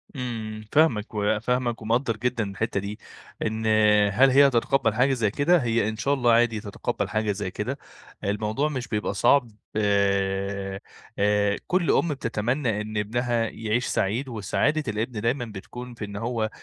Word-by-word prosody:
إمم، 110 Hz, -4 st, -5 dB
فاهمك، 125 Hz, -9 st, +2 dB
وفاهمك 115 Hz, +3 st, 0 dB
ومقدّر 115 Hz, 0 st, 0 dB
جدًا 120 Hz, -1 st, -1 dB
الحتّة 100 Hz, 0 st, -2 dB
دي، 100 Hz, +2 st, -6 dB, 0.5 s
إن 110 Hz, +1 st, -2 dB, 0.5 s
هل 135 Hz, +6 st, +5 dB
هي 140 Hz, +2 st, +6 dB
هتتقبّل 120 Hz, -2 st, +1 dB
حاجة 130 Hz, +4 st, +3 dB
زي 110 Hz, -5 st, 0 dB
كده؟ 165 Hz, +8 st, +3 dB
هي 115 Hz, -2 st, +1 dB
إن 110 Hz, -, -5 dB
شاء 140 Hz, +5 st, +1 dB
الله 125 Hz, -4 st, +3 dB
عادي 115 Hz, -1 st, +3 dB
تتقبّل 105 Hz, -2 st, -3 dB
حاجة 110 Hz, -1 st, 0 dB
زي 95 Hz, -2 st, -4 dB
كده، -, -, -3 dB, 0.5 s
الموضوع 105 Hz, +8 st, 0 dB
مش 130 Hz, -5 st, -4 dB
بيبقى 105 Hz, -3 st, -2 dB
صعب، 120 Hz, +3 st, +3 dB, 0.2 s
آآ 100 Hz, -1 st, 0 dB, 0.4 s
آآ 105 Hz, 0 st, +2 dB
كلّ 180 Hz, -2 st, +2 dB
أم -, -, +2 dB
بتتمنّى 115 Hz, -2 st, -1 dB
إن 110 Hz, 0 st, -5 dB
إبنها 120 Hz, +2 st, 0 dB
يعيش 115 Hz, +2 st, -1 dB
سعيد، 120 Hz, +8 st, -1 dB
وسعادة 135 Hz, +8 st, 0 dB
الإبن 110 Hz, +1 st, -2 dB
دايمًا 120 Hz, +3 st, 0 dB
بتكون 120 Hz, +4 st, -9 dB
في 110 Hz, -2 st, -6 dB
إن 100 Hz, -, -9 dB
هو 115 Hz, 0 st, -2 dB
110 Hz, 155 wpm, -25 LUFS, 105-125 Hz, 0.5 s, هي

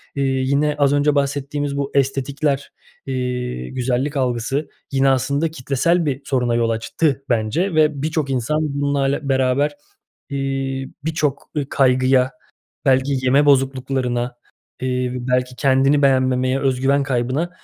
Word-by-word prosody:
İii, 135 Hz, -1 st, 0 dB
yine 150 Hz, +1 st, +2 dB
az 140 Hz, 0 st, +4 dB
önce 145 Hz, +1 st, +2 dB
bahsettiğimiz 140 Hz, 0 st, -1 dB
bu 140 Hz, 0 st, -2 dB
estetikler, 140 Hz, +1 st, 0 dB, 0.4 s
iii, 125 Hz, -, -3 dB
güzellik 130 Hz, +3 st, -1 dB
algısı 130 Hz, +3 st, -1 dB, 0.2 s
yine, 135 Hz, 0 st, +3 dB
aslında, 140 Hz, +4 st, +1 dB
kitlesel 160 Hz, +4 st, 0 dB
bir 140 Hz, -1 st, -2 dB
soruna 125 Hz, -4 st, 0 dB
yol 115 Hz, -1 st, +1 dB
açtı 135 Hz, +5 st, -1 dB
bence 125 Hz, -, 0 dB
ve 150 Hz, -3 st, +2 dB
birçok 155 Hz, -3 st, -1 dB
insan 130 Hz, +4 st, 0 dB, 0.2 s
bununlarla 140 Hz, 0 st, 0 dB
beraber, 135 Hz, +3 st, +1 dB, 0.5 s
iii, 135 Hz, -1 st, -3 dB
birçok 155 Hz, -4 st, -1 dB
i 145 Hz, -2 st, -2 dB
kaygıya, 130 Hz, 0 st, +3 dB, 0.5 s
belki 130 Hz, +1 st, +3 dB
yeme 140 Hz, +3 st, +4 dB
bozukluklarına, 130 Hz, -2 st, +1 dB, 0.5 s
iii, 125 Hz, -1 st, -2 dB
belki 125 Hz, 0 st, 0 dB
kendini 135 Hz, +1 st, +3 dB
beğenmemeye, 130 Hz, -1 st, +2 dB
öz 130 Hz, -2 st, 0 dB
güven 140 Hz, +1 st, +3 dB
kaybına 135 Hz, +5 st, -1 dB
135 Hz, 125 wpm, -20 LUFS, 130-145 Hz, 0.5 s, az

